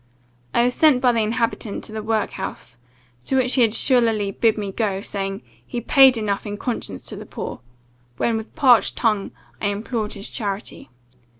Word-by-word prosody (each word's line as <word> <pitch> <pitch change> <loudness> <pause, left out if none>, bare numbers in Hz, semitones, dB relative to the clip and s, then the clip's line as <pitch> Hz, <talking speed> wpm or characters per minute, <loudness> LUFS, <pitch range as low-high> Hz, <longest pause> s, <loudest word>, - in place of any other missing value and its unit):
I 235 - +3
was 250 +1 +2
sent 300 -4 +5
by 250 -1 +4
the 230 - 0
inhabitant 225 -1 -2
to - - -10
the 220 0 -4
work 220 0 -1
house, 190 -9 -7 0.5
to - - 0
which 255 -1 +2
he 260 - +3
had 225 -2 +4
surlily 225 -5 +2
bid 225 +3 +2
me 200 -2 -3
go, 195 -2 -1
saying, 195 -3 -4 0.2
he 240 - -5
'paid 265 +1 +6
enough 210 -1 -2
in 205 0 -4
conscience 220 - -4
to - - -4
the - - -9
poor,' - - -6 0.6
when, 230 - +1
with 220 0 -6
parched 260 -7 +4
tongue, 215 -4 0 0.3
I 205 - +1
implored 215 +1 -3
his 200 -1 -7
charity. 205 -3 -5
220 Hz, 185 wpm, -22 LUFS, 205-245 Hz, 0.6 s, paid